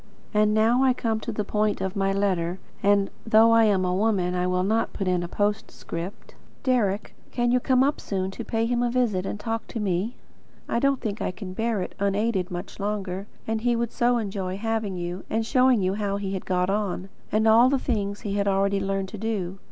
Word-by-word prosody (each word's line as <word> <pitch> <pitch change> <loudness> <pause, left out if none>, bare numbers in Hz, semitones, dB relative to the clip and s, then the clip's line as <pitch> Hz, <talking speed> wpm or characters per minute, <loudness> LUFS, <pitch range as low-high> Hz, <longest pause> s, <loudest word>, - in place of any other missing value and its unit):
And 210 0 +4
now 230 +4 +4
I 260 -1 +5
come 225 -3 -1
to 230 - -4
the 210 -1 -2
point 210 +1 0
of 190 -1 -3
my 195 -1 +1
letter, 185 -3 0 0.2
and, 200 0 +3
though 225 0 +5
I 230 0 +6
am 195 -3 +2
a 180 - 0
woman, 190 -3 +1
I 180 0 0
will 180 0 +1
not 220 +4 0
put 195 - -3
it - - +3
in 180 -1 +1
a 175 - -3
postscript. 205 -2 -3 0.3
Deryck, 220 -6 +1 0.2
can 240 -1 0
you 250 - +4
come 255 +1 +3
up 285 +2 0
soon, 190 -1 -2
to - - -6
pay 225 0 0
him 240 +1 0
a 245 - +2
visit, 225 -7 0
and 205 - -4
to - - -12
talk 225 -1 -3
to 230 - -5
me? 200 +4 -1 0.5
I - - 0
don't 275 0 +2
think 210 -1 -3
I - - 0
can 185 0 -7
bear 225 -1 -1
it, - - -7
unaided, 200 -1 0
much 180 +3 -7
longer; 200 -1 -3 0.2
and 220 0 -1
he 240 0 +2
would 235 0 -1
so 245 0 +2
enjoy 195 -4 -3
having 220 -2 -2
you, 175 +1 -4
and 225 +1 0
showing 255 -3 +4
you 185 +1 +1
how 200 -1 -1
he 195 -1 -3
had 190 - -5
got 180 0 +1
on, 200 -2 -2 0.2
and 215 +1 +2
all 230 +3 +7
the 275 - +2
things 205 -6 -2
he 205 - -3
had 200 0 0
already 195 0 +2
learned 195 0 -2
to 210 - -8
do. 195 -4 -3
205 Hz, 230 wpm, -25 LUFS, 190-225 Hz, 0.5 s, all